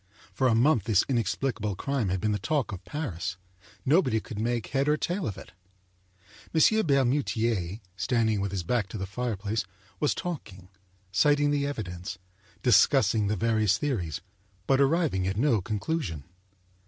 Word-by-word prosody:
For 130 - +2
a 115 - +3
month 120 - +3
this 110 -4 +3
in 130 -4 0
explicable 110 -1 -2
crime 135 -3 -1
had 95 0 0
been 105 +3 0
the 105 - 0
talk 145 +1 -1
of 95 -2 -7
Paris. 95 - -4 0.5
Nobody 140 -6 +3
could 110 -1 -8
make 120 0 -1
head 140 +1 0
or 150 - +3
tail 180 +2 -2
of 100 - -4
it. - - -11 1.0
M. 215 +6 +4
Bermutier, 120 - +1
standing 110 0 +1
with 100 -1 -2
his 95 -3 -2
back 105 +3 0
to 110 - -6
the 95 - -3
fireplace, 110 0 -2 0.4
was - - +1
talking, 100 - -6 0.4
citing 145 +4 +3
the 140 -1 +1
evidence, 95 -7 -5 0.5
discussing 105 -3 +4
the 105 - 0
various 110 -2 +2
theories, 100 - -2 0.4
but 135 +3 +3
arriving 140 - +2
at 95 +1 -2
no 120 -4 +3
conclusion. 105 - -3
115 Hz, 155 wpm, -28 LUFS, 100-140 Hz, 1.0 s, M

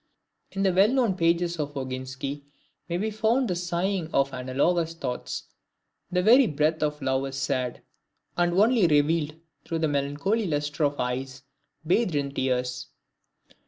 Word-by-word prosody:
In 195 0 -1
the 190 -2 +3
well 190 +3 +5
known 245 -4 +2
pages 170 0 +1
of 145 -1 -3
Oginski 130 +2 -5 0.5
may 170 - 0
be 215 +4 -1
found 225 +4 +1
the 180 - -1
sighing 175 0 -1
of 140 0 +1
analogous 150 +7 0
thoughts: 125 -6 -4 0.7
the 180 0 0
very 245 +5 +7
breath 155 +1 0
of 150 -1 -1
love 130 0 0
is 135 - -7
sad, 130 -2 -2 0.5
and 175 0 +2
only 210 +1 +4
revealed 150 0 +2 0.3
through 165 - -3
the 160 -1 +1
melancholy 145 +10 0
lustre 145 0 -1
of 145 0 -1
eyes 130 +1 -3 0.4
bathed 180 +1 +2
in 140 -1 -1
tears. 125 -1 -1
155 Hz, 150 wpm, -26 LUFS, 135-180 Hz, 0.7 s, very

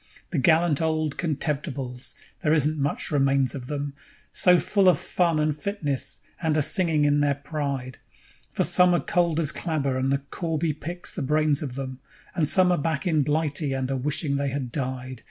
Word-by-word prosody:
"_ - - -43
The 165 - 0
gallant 160 +1 +3
old 155 -2 0
"Contemptibles"! 140 -5 -3 0.3
There 155 -3 +3
isn't 155 0 +1
much 140 +1 -1
remains 135 -3 +2
of 130 -3 -7
them, 145 -1 -3 0.4
So 180 -1 +5
full 195 +2 +3
of 175 - +4
fun 170 +2 0
and 150 -1 +1
fitness, 150 -5 -3 0.2
and 160 -2 +1
a 150 - +3
singing 160 -3 +2
in 145 0 +3
their 145 -1 +2
pride; 140 -3 -4 0.5
For - - 0
some 180 -1 +5
are - - +2
cold 170 -2 +1
as 155 -2 +2
clabber 140 -6 -1
and 135 +1 0
the 140 0 0
corby 165 -2 -1
picks 175 +4 -5
the - - -4
brains 150 +1 +2
of 135 -5 -5
them, 130 -1 -5 0.3
And 160 -5 +1
some 185 -1 +5
are 175 - +2
back 155 +3 -2
in 160 -4 +2
Blighty, 150 0 0
and 135 0 -2
a - - 0
wishing 140 +2 -1
they 140 0 -1
had 130 -2 -4
died. 130 -1 -4
150 Hz, 190 wpm, -25 LUFS, 135-160 Hz, 0.5 s, So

